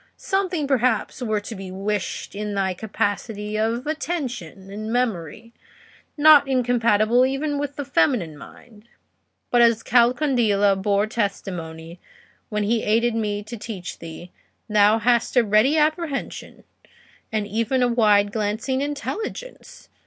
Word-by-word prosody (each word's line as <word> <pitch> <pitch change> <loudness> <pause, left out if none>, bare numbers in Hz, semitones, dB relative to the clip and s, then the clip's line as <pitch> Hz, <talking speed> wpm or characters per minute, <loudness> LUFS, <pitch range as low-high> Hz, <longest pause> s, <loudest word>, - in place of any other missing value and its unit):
Something 375 -5 -1
perhaps 255 -3 0
were 215 -3 0
to 205 - -8
be 195 -2 -8
wished 200 +1 -3
in 205 0 -4
thy 190 -1 0
capacity 210 +1 -3
of 225 +3 -1
attention 250 - -4
and 215 +2 -5
memory, 230 -2 -2 0.6
not 295 -1 +7
incompatible 240 -2 +2
even 280 +2 -1
with 285 -1 -4
the 285 - -5
feminine 165 - +1
mind. 215 +8 -15 0.6
But 240 - +4
as 230 -1 +4
Calcondila 235 -5 +3
bore 200 +1 +1
testimony, 175 -6 -4 0.5
when 210 -1 -1
he 225 +2 +1
aided 230 +2 +2
me 210 -2 -2
to 220 +3 -8
teach 205 -5 -7
thee, 165 +2 -10 0.4
thou 210 0 +4
hast 235 +2 +1
a 245 - +6
ready 215 +8 +3
apprehension, 310 -1 -2 0.7
and 215 -2 -1
even 230 +5 0
a - - +3
wide 210 -4 +3
glancing 220 +5 -2
intelligence. 295 - -6
225 Hz, 130 wpm, -23 LUFS, 205-255 Hz, 0.7 s, not